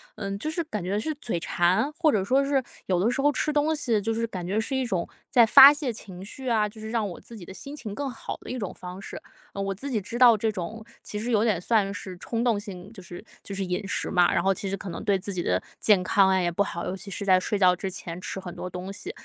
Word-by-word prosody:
嗯， 200 -1 -4
就 310 - -2
是 335 +2 -2
感 210 - -4
觉 195 +3 -1
是 310 - -2
嘴 225 - -3
馋， 185 - +1
或 320 -1 +3
者 200 -7 +1
说 265 +6 +3
是 275 -1 +1 0.2
有 180 -2 +2
的 205 +6 +2
时 260 - -3
候 290 - +4
吃 290 +2 -1
东 300 +2 +2
西 240 -7 +1
就 225 +2 -1
是 230 +1 -1
感 185 -5 -6
觉 200 +4 0
是 265 +5 -3
一 265 -1 0
种 185 -7 -2 0.2
在 240 - +7
发 275 +5 +10
泄 290 -4 -2
情 190 -5 -10
绪 260 +6 -9
啊， 215 -3 +2
就 220 - -14
是 220 0 -6
让 225 -3 0
我 175 - -9
自 235 - -12
己 205 - -10
的 180 - -10
心 280 +9 -9
情 215 -8 -7
更 285 +5 -3
好 245 - -6
的 - - -9
一 255 - -3
种 200 -5 -3
方 180 +2 -9
式。 - - -7 0.3
呃， 200 - -4
我 195 0 -1
自 270 +9 -6
己 235 -5 0
知 230 +5 -6
道 240 -3 +8
这 220 +1 0
种 215 +3 -6 0.2
其 210 - -6
实 230 +4 -2
有 215 -2 +3
点 215 -6 +2
算 200 +1 +1
是 190 -2 -7
冲 230 +3 -2
动 235 -4 +2
性， 200 -1 -9
就 195 - -11
是 175 +4 -10 0.2
就 200 - -7
是 195 -1 -2
饮 180 +2 -3
食 - - -2
嘛， 180 -2 +4
然 170 - +1
后 195 0 +3
其 195 +1 -4
实 195 - -2
可 195 0 -7
能 170 - -6
对 200 -3 +2
自 195 +1 -5
己 180 - -1
的 90 - +1 0.2
健 200 -4 +4
康 195 0 +4
呀， - - +2
也 175 -1 0
不 170 - -1
好， 170 -4 -2
尤 180 - -3
其 195 +1 -8
是 200 +1 -4
在 185 -1 +5
睡 210 +3 -1
觉 185 -2 +5
之 190 +2 -4
前 175 -1 -7
吃 190 - -5
很 180 -2 -8
多 180 - -5
东 185 +2 -6
西。 370 - -6
205 Hz, 315 characters per minute, -26 LUFS, 185-235 Hz, 0.3 s, 发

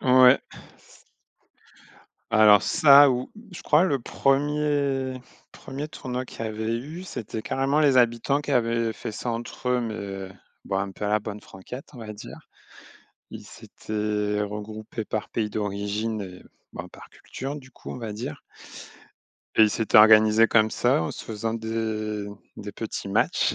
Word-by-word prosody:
Ouais. 130 0 +7
C - - -27 1.9
Alors 105 -2 +6
ça 140 -1 +7
ou 125 0 -2 0.2
je 180 - -8
crois 155 +4 +4
le 140 -7 +1
1er- 140 -1 0 0.3
1er 140 +3 -7
tournoi 130 -3 -5
qu'il 115 - -7
y - - -2
avait 110 +1 -3
eu, 155 +8 -8
c'était 110 - -6
carrément 135 +5 0
les 140 -3 +4
habitants 120 +4 +2
qui 145 - -6
avaient 115 -3 +1
fait 110 +1 -6
ça 120 - -4
entre 120 +1 -5
eux, 125 0 +2
mais 100 -4 -5 0.4
bon, 95 - -1
un 100 0 -2
peu 95 - -7
à - - 0
la 105 0 +2
bonne 105 0 -7
franquette, 120 +8 -10
on 125 - -12
va 110 -2 -7
dire. 105 - -10 0.9
Ils - - -9
s'étaient 105 -1 -3
regroupés 105 +2 -6
par 110 - -4
pays 110 -2 -2
d'origine 105 +1 -3
et 90 -2 -9 0.3
ben - - -7
par - - -14
culture 135 +2 -7
du 130 -3 -12
coup, - - -10
on - - -6
va 115 -3 -5
dire 105 -7 -6 1.2
et - - +7
ils 105 - +5
s'étaient 110 -1 +3
organisés 110 +1 +7
comme 110 -1 +3
ça, 125 -5 +2
en - - -3
se - - -9
faisant 110 +1 -3
des 110 -2 -3 0.3
des 105 -1 -8
petits 110 -2 -5
matchs 100 - +1
115 Hz, 165 wpm, -25 LUFS, 105-130 Hz, 1.9 s, Ouais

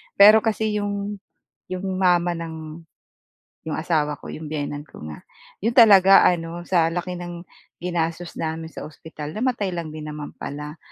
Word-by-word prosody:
Pero 210 +2 +9
kasi 220 -1 0
yung 205 0 -3 0.5
yung 185 +1 -4
mama 175 -2 +3
ng 160 -1 -7 0.8
'yong 160 - -3
asawa 150 -3 0
ko - - -9
'yong 155 - -7
biyenan 145 -1 -4
ko - - -14
nga, 75 - -8 0.5
'yon 230 - +2
talaga 195 -5 +8
ano, 170 0 -3
sa 165 -3 +3
laki 180 0 -3
ng 175 -1 -7 0.4
ginastos 170 -1 -2
namin 160 0 -3
sa - - -8
ospital 150 0 -9
namatay 215 -5 -1
lang 170 -2 -4
din 155 -1 -7
naman 150 -1 -6
pala. 150 +2 -6
170 Hz, 155 wpm, -23 LUFS, 155-195 Hz, 0.8 s, Pero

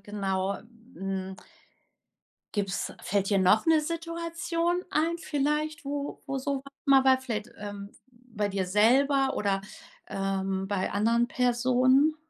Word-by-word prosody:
genau, 195 -1 -2 0.4
hm 190 0 -4 1.2
Gibt's 195 -2 -2
fällt 200 +1 0
dir 200 - +3
noch 190 +4 +4
'ne 320 -1 +5
Situation 335 +2 -2
ein 325 +3 +1
vielleicht, 300 0 -1
wo 285 0 -4
wo 275 -1 -2
sowas 275 0 -2 0.2
mal 270 -2 +5
war, 260 0 +5
vielleicht, 235 -3 -4
ähm, 205 0 -7 0.2
bei 235 -4 -4
dir 190 -2 -2
selber 265 +7 +3
oder, 195 -1 0 0.5
ähm, 195 0 -2
bei 195 -2 -1
anderen 230 +4 +2
Personen? 255 +4 +3
245 Hz, 120 wpm, -28 LUFS, 200-285 Hz, 1.2 s, ne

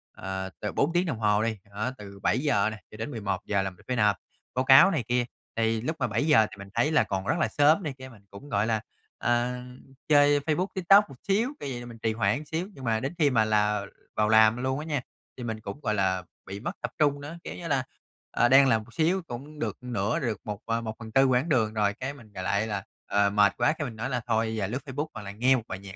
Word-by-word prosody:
ờ, 95 0 -4
từ 105 - -3
4 160 +4 +1
tiếng 175 +1 +2
đồng 135 -9 -3
hồ 105 0 +2
đi, 110 -2 -1
đó, 110 +5 -2
từ 100 -1 -11
7:00 125 -6 +2
nè 110 - -7
cho 110 - -11
đến 115 +7 -4
11:00 100 -2 -1
là 95 - -2
mình 90 - -19
phải 125 - -1
nộp 105 -4 +3 0.4
báo 130 +1 +1
cáo 135 +9 +8
này 145 -8 0
kia. 125 0 +1 0.3
Thì 115 -1 +1
lúc 160 +6 -2
mà 125 - +1
7:00 120 0 +3
thì 100 - -11
mình 100 0 -9
thấy 120 +7 +2
là - - +4
còn 95 0 -3
rất - - +2
là - - +2
sớm 155 +6 +3
này 145 -3 -3
kia, 130 0 -9
mình 110 -5 -16
cũng, 140 +9 -11
gọi 105 +2 +1
là, 110 -2 0 0.4
ờ, 120 +1 +1 0.5
chơi 145 -1 +5
Facebook, 160 +6 0
TikTok 195 0 +5
một 135 - -11
xíu, 215 +6 +2
kiểu 140 - -5
vậy 120 - -4
là 120 - -8
mình 115 -1 -10
trì 110 -1 +1
hoãn 115 +7 0
xíu, 165 +5 -3
nhưng 135 - -11
mà 110 -2 +1
đến 135 +7 -3
khi 150 -4 +4
mà 110 -4 +3
là 105 -1 +1 0.3
vào 105 0 +2
làm 110 +1 +6
luôn 130 +2 -1
á 155 - -6
nha, 145 -5 -1 0.4
thì 125 - -6
mình 110 -2 -4
cũng, 100 +7 -7
gọi 105 - 0
là, 95 -2 +1 0.2
bị 100 +1 -7
mất - - -3
tập - - -3
trung 145 -2 +2
nữa, 160 +4 -7
kiểu - - -6
như 170 - -7
là, 135 -4 +1 0.5
ờ, 120 - +3
đang 135 +1 +7
làm 110 -3 +2
một 115 - -18
xíu 175 +4 +1
cũng 145 +5 -8
được - - -3
nửa, 115 -3 -1
được 115 -5 -2
một 105 -1 -5
à, 115 0 -1
1/4 110 +3 0
quãng 130 +5 +2
đường 110 -6 +2
rồi, 105 -2 +1
cái 130 +6 -5
mình, 110 -7 -16
gọi 95 - -5
lại 100 +3 0
là, 105 -3 -3 0.2
ờ, 100 0 +3
mệt 100 -1 +4
quá 155 - +3
cái 155 -2 -4
mình 115 - -8
nói 120 +5 -3
là: 125 -2 -1
"Thôi, 110 -1 +1
giờ 100 -3 -1
lướt 125 +6 -3
Facebook 145 +3 -3
hoặc 110 - -7
là 100 - -7
nghe 125 +6 +3
một 115 - -2
bài 95 - -5
nhạc 100 0 -10
115 Hz, 265 wpm, -27 LUFS, 105-140 Hz, 0.5 s, cáo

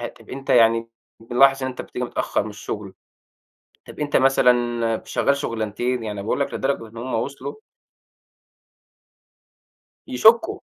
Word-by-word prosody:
آآ 120 - -3
طَب 115 - -16
أنت 135 +1 -6
يعني 115 -1 +4 0.3
بنلاحظ 135 +4 +3
إن 130 - -1
أنت 130 - -6
بتيجي 125 - -5
متأخّر 120 - -1
من 110 - -6
الشُغل، 105 -1 -7 0.9
طَب - - -11
أنت 145 -1 +1
مثلًا 120 -3 +2
شغّال 140 - +1
شُغلنتين؟" 115 -1 -2
يعني 105 -2 -5
باقول 110 - -1
لك 140 - -1
لدرجة 135 -4 -2
إن 110 - -17
هم 125 +3 -5
وصلوا 140 +4 -3 2.5
يشكُّوا. 220 - +4
120 Hz, 135 wpm, -22 LUFS, 115-135 Hz, 2.5 s, يعني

